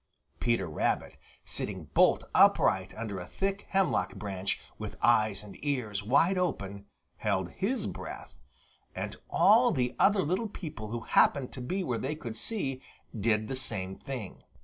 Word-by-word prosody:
Peter 115 -4 +1
Rabbit, 75 - -1 0.3
sitting - - -4
bolt - - +5
upright - - +4
under 105 -4 -4
a 90 - -7
thick 195 +1 -2
hemlock 155 - +1
branch, 100 -1 -3 0.2
with - - -5
eyes 110 -4 +3
and 105 - -12
ears 125 -9 -1
wide 165 - +3
open, 100 - -2 0.3
held 95 -4 -1
his 220 +8 -1
breath. - - -7 0.6
And - - -4
all 235 +4 +6
the 125 - 0
other 200 -1 +5
little 185 +8 0
people 150 - -7
who 115 +2 -4
happened 130 +3 +3
to 130 - -6
be 185 +10 -2
where 120 -8 -1
they 145 +4 -2
could 120 -7 -6
see 135 - -3 0.3
did 110 0 +1
the 135 - -3
same 100 -7 -2
thing. 130 -8 -7
125 Hz, 150 wpm, -30 LUFS, 105-170 Hz, 0.6 s, all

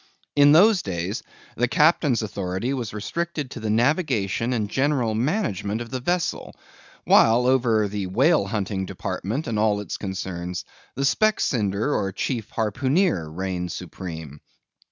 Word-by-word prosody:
In 145 0 +6
those 190 +5 +6
days, 95 +3 -3 0.3
the 125 - +1
captain's 145 -1 +3
authority 100 +4 -3
was 120 -6 -3
restricted 150 +6 -4
to - - -7
the 110 - -3
navigation 120 - +1
and 110 -4 0
general 130 -1 +1
management 115 - -1
of 120 0 -7
the 130 - -2
vessel; 175 +6 -2 0.5
while 115 +2 +5
over 120 -5 +3
the 100 -1 -3
whale 130 - +3
hunting 100 -2 -2
department 115 - -4
and 110 -2 -2
all 105 -1 +2
its 105 - -5
concerns, 90 -2 -5 0.3
the 135 - -2
Specksnyder 125 - +1
or 95 - 0
Chief 115 +2 -3
Harpooneer 130 - 0
reigned 90 +1 -3
supreme. 80 -5 -7
110 Hz, 135 wpm, -24 LUFS, 95-135 Hz, 0.5 s, In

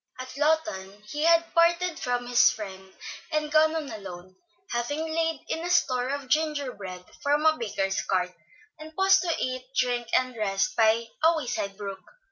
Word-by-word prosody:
At 255 0 -8
Lawton 210 -10 -1
he 300 +2 -1
had 335 0 +4
parted 340 0 +3
from 245 -1 -1
his 245 0 +5
friend 190 -2 -7 0.4
and 305 -1 -1
gone 310 +1 +4
on 310 -3 -3
alone, 185 -3 -9 0.4
having 290 +7 -2
laid 325 -2 0
in - - -2
a 350 - -3
store 255 -8 +2
of 280 -1 -3
gingerbread 255 - -2 0.2
from 290 +2 +1
a 315 0 +5
baker's 200 -6 -1
cart, 180 -1 -1 0.5
and 310 +1 -11
paused 385 0 +5
to 340 -2 0
eat, 255 0 -3
drink, 245 -1 +1
and 255 -1 -1
rest 195 -3 0
by 225 +1 +3 0.2
a 325 +1 +5
wayside 200 -8 -3
brook. 195 -2 -6
255 Hz, 165 wpm, -27 LUFS, 205-315 Hz, 0.5 s, his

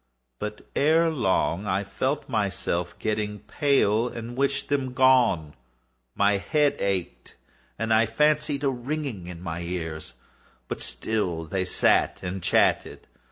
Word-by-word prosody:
But, 105 0 -6
ere 160 +3 +3
long, 100 - 0
I 95 +1 0
felt 135 +8 -2
myself 100 -6 -1
getting 105 -1 -2
pale 120 -3 +1
and 120 +1 -7
wished 140 +1 0
them 135 -3 -1
gone. 125 - +3 0.6
My 100 0 +3
head 145 +7 +1
ached, 95 -3 -3 0.4
and 115 0 0
I 110 +1 +4
fancied 150 +3 +1
a 140 - +3
ringing 130 - -4
in 90 -1 -8
my 85 -1 -4
ears: 80 -6 -5 0.5
but - - -5
still 90 -7 -2
they 95 +3 -2
sat - - +3
and 90 0 -4
still - - 0
chatted. - - +2
110 Hz, 135 wpm, -25 LUFS, 95-135 Hz, 0.6 s, I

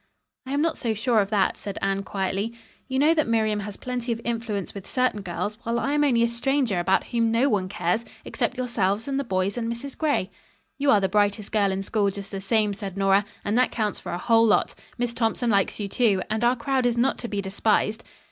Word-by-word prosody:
"I 270 - -3
am 290 +2 +2
not 330 -1 0
so 225 -3 -1
sure 230 +1 +2
of 200 -1 +1
that," 205 -3 +1
said 200 -1 -6
Anne 195 0 0
quietly. 195 +3 -2 0.3
"You 260 0 -2
know 300 +4 +5
that 310 -5 +1
Miriam 220 -2 +1
has 205 0 -6
plenty 250 -1 -3
of 230 - -2
influence 225 -5 -3
with 200 -1 -9
certain 255 -5 0
girls, 205 +4 -4
while 230 +1 -1
I 275 - -1
am 295 0 +3
only 240 -5 +3
a - - +4
stranger 240 -3 0
about 190 +2 +2
whom 230 -1 0
no 240 +5 +3
one 195 -5 0
cares 195 +3 0 0.2
except - - -2
yourselves 225 -4 0
and 275 0 -1
the - - -1
boys 195 0 -1
and 230 0 -2
Mrs. 260 +4 -6
Gray. 290 - 0 0.5
"You 280 0 +2
are 210 - +6
the 190 - +2
brightest 205 +1 +1
girl 200 -2 +2
in 190 0 -2
school 205 0 +1
just 200 0 -7
the 195 -1 -4
same," 210 +1 +1
said 195 -1 -6
Nora, 195 +1 +4 0.2
"and 205 - 0
that 255 - +4
counts 215 -4 -1
for - - -7
a 175 - -2
whole 225 +4 +4
lot. 220 - +3 0.2
Miss 245 -1 -1
Thompson 235 0 0
likes 200 +1 +1
you, 205 - -2
too, 200 -3 +2
and 220 +2 0
our 240 +1 +4
crowd 255 +1 0
is 240 -1 0
not 255 +3 +2
to 235 - -4
be 205 -3 -3
despised." 210 +3 0
220 Hz, 235 wpm, -25 LUFS, 200-245 Hz, 0.5 s, are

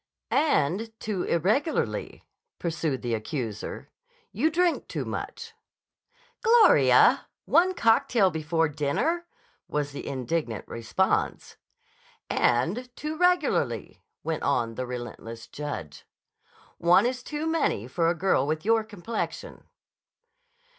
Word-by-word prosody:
"And 225 - +1
too 205 -4 -3
irregularly," 215 - 0 0.3
pursued 160 -6 -2
the 120 -1 -1
accuser. 110 -1 -4 0.4
"You 280 +10 +1
drink 345 +1 +1
too - - -4
much." 460 0 -6 0.9
"Gloria! 460 -1 +6 0.2
One 370 +2 +3
cocktail 230 - +3
before 160 +1 0
dinner," 155 - -1 0.4
was 145 -1 -2
the 140 - -7
indignant 130 -3 -3
response. 115 -1 -1 0.8
"And 170 - +1
too 305 +1 -4
regularly," 360 +2 +1 0.2
went 160 -2 -2
on 115 -5 0
the 130 +2 -4
relentless 115 -2 -7
judge. 145 - -6 0.8
"One 175 +6 +5
is 250 +1 -1
one 250 - -17
too 300 +1 -4
many 320 - 0
for 165 +5 +1
a 175 - +1
girl 165 -6 +2
with 155 +3 -2
your 225 0 +3
complexion." 215 +1 -5
170 Hz, 110 wpm, -27 LUFS, -, 0.9 s, Gloria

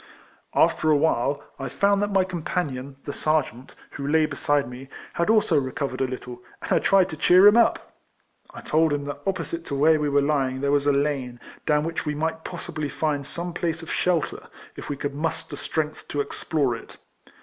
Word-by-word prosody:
After 155 - +3
awhile, 145 -2 +2 0.2
I 135 -1 -4
found 200 +8 +2
that 205 0 0
my 195 -1 +4
companion, 150 -7 -3
the 145 - -4
sergeant, 140 -5 -1 0.2
who 140 - -5
lay 155 +1 +4
beside 145 -2 0
me, 125 +2 -10 0.3
bad 170 +4 0
also 215 -9 +4
recovered 130 0 -3
a 130 - +2
little, 125 -1 -7 0.2
and - - -6
I - - +4
tried 195 -2 +4
to 155 - -6
cheer 180 +5 +6
him 205 +1 +8
up. 235 -1 +2 0.6
I - - -10
told 160 0 +2
him 145 -1 -2
that 145 0 -5
opposite 170 -3 -2
to 140 - -3
Avhere 155 +3 +4
we 150 -1 0
were 140 0 +3
lying 135 -3 0
there 140 +1 0
was 145 0 +2
a - - +6
lane, 140 -4 -1 0.3
down 150 0 +3
wliic 165 0 -4
li - - +1
we - - -6
might 160 +1 -2
possibly 155 -4 -5
find 145 -2 -1
soujc 170 +3 -6
})lace 170 -1 -1
of 165 - -7
shelter, 175 -4 0 0.3
if - - -8
we 145 - -3
could 140 +1 -3
muster 155 +3 -3
strength 155 -1 -3
to 145 - -3
ex 145 - -4
plore 145 -7 +1
it. 115 - -12
150 Hz, 205 wpm, -24 LUFS, 140-165 Hz, 0.6 s, him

